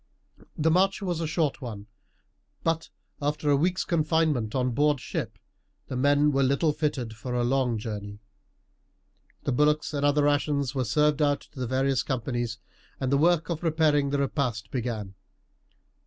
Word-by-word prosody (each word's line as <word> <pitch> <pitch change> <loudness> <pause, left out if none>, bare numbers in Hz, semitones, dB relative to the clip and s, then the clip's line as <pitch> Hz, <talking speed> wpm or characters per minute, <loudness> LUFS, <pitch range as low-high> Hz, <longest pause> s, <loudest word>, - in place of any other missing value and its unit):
The 160 +1 +2
march 195 +4 +2
was 175 -4 -1
a 165 - -1
short 155 -3 -1
one, 110 -5 -7 0.8
but 165 0 -1 0.3
after 145 0 0
a - - +5
week's 180 +6 +1
confinement 155 -8 +1
on 125 -1 +1
board 145 +2 +2
ship - - -4 0.5
the - - -4
men 145 +3 +3
were 135 -1 +1
little 140 +4 +2
fitted 145 -7 -2
for 125 +2 -5
a 120 - +1
long 125 -2 +1
journey. 105 -2 -6 1.3
The - - -1
bullocks 150 +4 +2
and 145 -1 -1
other 145 0 +3
rations 145 -2 +1
were 130 -2 -1
served 150 +5 +2
out 145 -1 +2
to 145 - -14
the 125 - -2
various 130 +1 +1
companies, 120 -3 -2 0.4
and 130 -1 -1
the 140 - +4
work 170 +1 +3
of 165 - -2
preparing 155 -4 +2
the 140 - 0
repast 135 -5 -1
began. 115 -6 -3
140 Hz, 160 wpm, -27 LUFS, 125-150 Hz, 1.3 s, a